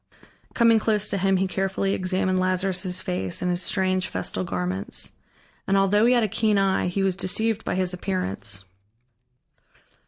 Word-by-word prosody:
Coming 230 Hz, -2 st, +5 dB
close 210 Hz, -1 st, +1 dB
to 200 Hz, -, -1 dB
him, 195 Hz, 0 st, +2 dB
he 190 Hz, -, +1 dB
carefully 195 Hz, +1 st, -1 dB
examined 185 Hz, 0 st, 0 dB
Lazarus' 185 Hz, 0 st, 0 dB
face 95 Hz, -, -1 dB
and 180 Hz, -, +1 dB
his 175 Hz, 0 st, +4 dB
strange 185 Hz, 0 st, 0 dB
festal 95 Hz, 0 st, -3 dB
garments. 90 Hz, +1 st, -3 dB, 0.6 s
And 195 Hz, -, +2 dB
although 205 Hz, +3 st, +3 dB
he 250 Hz, -, +5 dB
had 240 Hz, -, +3 dB
a -, -, +2 dB
keen 215 Hz, +1 st, +1 dB
eye, 195 Hz, -2 st, +1 dB
he 195 Hz, +2 st, -1 dB
was 190 Hz, -2 st, +1 dB
deceived 220 Hz, +4 st, -1 dB
by -, -, -2 dB
his 185 Hz, -1 st, 0 dB
appearance. 105 Hz, -, -3 dB
185 Hz, 160 wpm, -24 LUFS, 180-195 Hz, 0.6 s, Coming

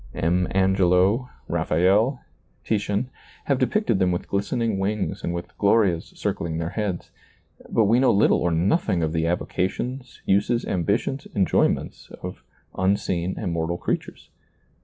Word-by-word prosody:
M. 90 Hz, +2 st, +1 dB
Angelo, 95 Hz, +5 st, +3 dB, 0.2 s
Raphael, 100 Hz, -, +2 dB, 0.4 s
Titian, 105 Hz, +3 st, -1 dB, 0.3 s
have 140 Hz, -2 st, +1 dB
depicted 130 Hz, -, +1 dB
them 90 Hz, -2 st, +3 dB
with 90 Hz, -, -3 dB
glistening 105 Hz, +1 st, -1 dB
wings 100 Hz, 0 st, -2 dB
and -, -, -1 dB
with 85 Hz, 0 st, -6 dB
glorias 100 Hz, -5 st, +3 dB
circling 80 Hz, -1 st, -2 dB
their 85 Hz, 0 st, -3 dB
heads, 100 Hz, -5 st, -3 dB, 0.6 s
but 115 Hz, -, +3 dB
we 115 Hz, +4 st, +4 dB
know 130 Hz, -, +4 dB
little 100 Hz, -, +4 dB
or 90 Hz, -, +1 dB
nothing 90 Hz, -, +1 dB
of 80 Hz, 0 st, -1 dB
the 80 Hz, 0 st, 0 dB
avocations, 115 Hz, +9 st, -3 dB
uses, 100 Hz, +5 st, +2 dB
ambitions, 100 Hz, +9 st, -1 dB
enjoyments 95 Hz, -2 st, +1 dB
of -, -, -7 dB, 0.3 s
unseen 95 Hz, -2 st, 0 dB
immortal 85 Hz, -3 st, -2 dB
creatures. -, -, -4 dB
95 Hz, 130 wpm, -24 LUFS, 85-110 Hz, 0.6 s, we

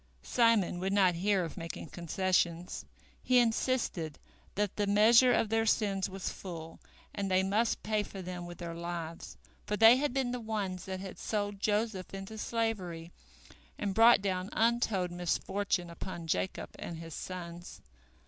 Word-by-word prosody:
Simon 230 Hz, -7 st, +3 dB
would 190 Hz, +2 st, -1 dB
not 190 Hz, -3 st, +4 dB
hear 190 Hz, +2 st, +1 dB
of 165 Hz, -, -8 dB
making 165 Hz, -1 st, -6 dB
concessions. 175 Hz, 0 st, -1 dB, 0.4 s
He 255 Hz, -, +3 dB
insisted 225 Hz, -, +1 dB, 0.4 s
that 205 Hz, -1 st, -1 dB
the 205 Hz, -1 st, 0 dB
measure 230 Hz, +5 st, +6 dB
of 220 Hz, -, +2 dB
their 225 Hz, 0 st, +1 dB
sins 195 Hz, -3 st, +1 dB
was 190 Hz, 0 st, -4 dB
full, 165 Hz, -3 st, -8 dB, 0.3 s
and 200 Hz, -1 st, -2 dB
they 185 Hz, 0 st, +3 dB
must 210 Hz, +4 st, +1 dB
pay 215 Hz, -1 st, +1 dB
for 200 Hz, -1 st, -8 dB
them 175 Hz, -1 st, -6 dB
with 175 Hz, -1 st, -9 dB
their 170 Hz, -1 st, -5 dB
lives, 170 Hz, -1 st, -6 dB, 0.3 s
for 210 Hz, -, -1 dB
they 225 Hz, +3 st, +8 dB
had 290 Hz, +1 st, 0 dB
been 260 Hz, -1 st, 0 dB
the 250 Hz, -, -3 dB
ones 205 Hz, -5 st, -3 dB
that 190 Hz, -1 st, -5 dB
had 190 Hz, -1 st, -8 dB
sold 205 Hz, -2 st, -2 dB
Joseph 210 Hz, -2 st, -1 dB
into 195 Hz, +3 st, -7 dB
slavery, 190 Hz, -8 st, -2 dB, 0.7 s
and 200 Hz, -2 st, -2 dB
brought 225 Hz, 0 st, +6 dB
down 185 Hz, -1 st, -1 dB
untold 225 Hz, -6 st, +1 dB
misfortune 175 Hz, +1 st, -1 dB
upon 170 Hz, 0 st, -6 dB
Jacob 170 Hz, +3 st, -2 dB
and 170 Hz, -, -6 dB
his 165 Hz, -1 st, -8 dB
sons. 175 Hz, 0 st, -7 dB
195 Hz, 160 wpm, -31 LUFS, 175-220 Hz, 0.7 s, they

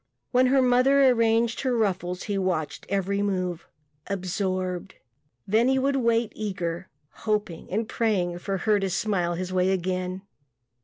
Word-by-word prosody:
When 255 Hz, +1 st, +4 dB
her 265 Hz, 0 st, +4 dB
mother 260 Hz, +2 st, +5 dB
arranged 230 Hz, -1 st, +2 dB
her 255 Hz, -3 st, 0 dB
ruffles 185 Hz, -4 st, -1 dB
he 205 Hz, -, -2 dB
watched 185 Hz, -5 st, -2 dB
every 200 Hz, 0 st, 0 dB
move 185 Hz, -4 st, -2 dB, 0.4 s
absorbed. 185 Hz, -1 st, -2 dB, 0.5 s
Then 220 Hz, +5 st, +3 dB
he 265 Hz, 0 st, +3 dB
would 275 Hz, +1 st, +1 dB
wait 230 Hz, -3 st, +1 dB
eager, 185 Hz, -4 st, -4 dB, 0.2 s
hoping 210 Hz, -6 st, -3 dB
and 215 Hz, +3 st, -1 dB
praying 185 Hz, -8 st, 0 dB
for 195 Hz, +2 st, -2 dB
her 210 Hz, +2 st, +2 dB
to 195 Hz, -1 st, -1 dB
smile 180 Hz, -3 st, 0 dB
his 185 Hz, +1 st, -4 dB
way 185 Hz, 0 st, +2 dB
again... 185 Hz, 0 st, -2 dB
195 Hz, 145 wpm, -26 LUFS, 185-230 Hz, 0.5 s, mother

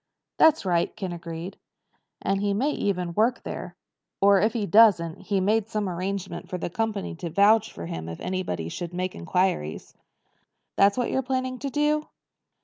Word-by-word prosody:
"That's 320 Hz, -7 st, +5 dB
right," 175 Hz, -2 st, +1 dB
Ken 185 Hz, -3 st, -4 dB
agreed. 170 Hz, +2 st, -7 dB, 0.6 s
"And 195 Hz, 0 st, 0 dB
he 200 Hz, -1 st, +1 dB
may 270 Hz, +8 st, +1 dB
even 180 Hz, -8 st, -1 dB
work 225 Hz, +6 st, +1 dB
there. -, -, -6 dB, 0.4 s
Or, 200 Hz, -1 st, +5 dB
if 215 Hz, +1 st, +2 dB
he 220 Hz, -4 st, -1 dB
doesn't, 200 Hz, -7 st, +5 dB
he's 195 Hz, 0 st, 0 dB
made 215 Hz, +2 st, +1 dB
some 210 Hz, -3 st, -1 dB
arrangement 185 Hz, +1 st, -4 dB
for 185 Hz, -, -3 dB
the 175 Hz, -, -4 dB
company 220 Hz, -1 st, -2 dB
to 170 Hz, 0 st, -5 dB
vouch 210 Hz, +5 st, +4 dB
for 85 Hz, -, -8 dB
him 80 Hz, 0 st, -5 dB
if 85 Hz, -, -7 dB
anybody 180 Hz, -, -3 dB
should 175 Hz, -, -6 dB
make 185 Hz, +1 st, -2 dB
inquiries." 85 Hz, -, -1 dB, 0.8 s
"That 200 Hz, +2 st, +4 dB
what 245 Hz, -, 0 dB
you're 265 Hz, -, +1 dB
planning 255 Hz, 0 st, -2 dB
to 280 Hz, -, -3 dB
do?" 300 Hz, +2 st, +1 dB
195 Hz, 170 wpm, -26 LUFS, 175-225 Hz, 0.8 s, That's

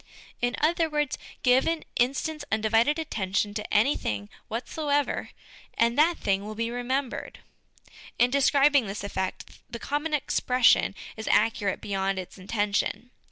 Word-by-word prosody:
In 245 Hz, +1 st, +1 dB
other 330 Hz, +1 st, +2 dB
words, 295 Hz, -2 st, 0 dB, 0.3 s
give 255 Hz, +1 st, +4 dB
an 330 Hz, -1 st, 0 dB
instant's 280 Hz, +5 st, 0 dB
undivided 225 Hz, +7 st, +2 dB
attention 205 Hz, -9 st, -1 dB
to 210 Hz, 0 st, -5 dB
any 225 Hz, +7 st, +4 dB
tiling 100 Hz, -1 st, -3 dB, 0.2 s
whatsoever, 285 Hz, +5 st, -1 dB, 0.5 s
and 235 Hz, +1 st, +2 dB
that 325 Hz, +4 st, +4 dB
thing 195 Hz, 0 st, 0 dB
will 215 Hz, +1 st, -6 dB
be 230 Hz, +1 st, -2 dB
remembered. 250 Hz, +2 st, -3 dB, 0.8 s
In 245 Hz, +1 st, +3 dB
describing 280 Hz, -2 st, +4 dB
this 195 Hz, +1 st, -5 dB
effect, 190 Hz, -2 st, -4 dB
the 235 Hz, -, -5 dB
common 295 Hz, +5 st, -1 dB
expression 250 Hz, -7 st, +3 dB, 0.2 s
is 220 Hz, -, -7 dB
accurate 205 Hz, -3 st, +2 dB
beyond 195 Hz, -1 st, -1 dB
its 185 Hz, +1 st, -7 dB
intention. 205 Hz, +3 st, -1 dB
240 Hz, 135 wpm, -27 LUFS, 205-285 Hz, 0.8 s, give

